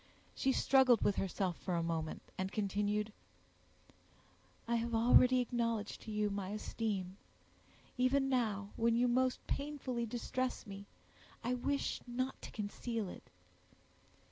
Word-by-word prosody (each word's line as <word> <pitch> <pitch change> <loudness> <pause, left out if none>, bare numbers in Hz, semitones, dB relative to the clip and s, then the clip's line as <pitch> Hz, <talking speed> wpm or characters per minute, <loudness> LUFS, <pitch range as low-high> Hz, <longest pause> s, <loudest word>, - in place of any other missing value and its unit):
She 270 - +1
struggled 260 -3 +5
with 200 - +2
herself 185 -2 -1
for 180 - -2
a 170 - +1
moment, 160 -1 -2
and 190 +1 -2
continued, 210 +1 0 1.5
"I 235 0 +2
have 230 0 -1
already 250 +2 +6
acknowledged 230 -3 -1
to 220 - -7
you 210 -1 0
my 200 -2 -3
esteem; 200 -3 -3 0.8
even 270 +2 +3
now, 215 -6 0
when 230 0 +3
you 245 +1 +3
most 255 +1 +1
painfully 275 -5 -2
distress 250 +3 -2
me, 200 -1 -8 0.6
I 245 +2 0
wish 280 +3 -1
not 255 +2 -2
to - - -7
conceal 215 0 -3
it. - - -11
230 Hz, 130 wpm, -35 LUFS, 200-250 Hz, 1.5 s, already